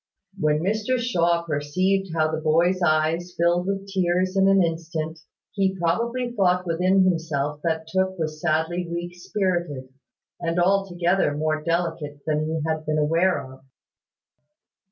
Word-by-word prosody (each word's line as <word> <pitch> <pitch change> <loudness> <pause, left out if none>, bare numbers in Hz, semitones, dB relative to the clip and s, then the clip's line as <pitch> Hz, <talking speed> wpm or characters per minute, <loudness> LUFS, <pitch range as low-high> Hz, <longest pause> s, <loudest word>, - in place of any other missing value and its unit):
When 150 -1 +1
Mr 215 +6 0
Shaw 170 -8 +1
perceived 175 +5 0
how 155 -1 +2
the 160 0 -3
boy's 170 +4 +2
eyes 165 +2 +1
filled 175 +2 +2
with 195 0 -2
tears 185 -1 0
in 195 0 +4
an 195 -1 +5
instant, 165 -1 -3 0.3
he 195 -2 0
probably 235 +9 0
thought 180 -3 +2
within 180 +3 +3
himself 155 -5 -1
that 160 -1 -1
Tooke 190 +2 0
was 155 -2 -4
sadly 170 +2 0
weak 170 +1 -4
spirited, 175 -8 -2 0.5
and 170 0 -1
altogether 180 -4 +1
more 155 0 -1
delicate 165 -3 -2
than 155 -1 0
he 160 0 -2
had 160 -1 -1
been 155 0 +1
aware 165 +4 +2
of. 130 0 -14
170 Hz, 140 wpm, -24 LUFS, 155-185 Hz, 0.5 s, an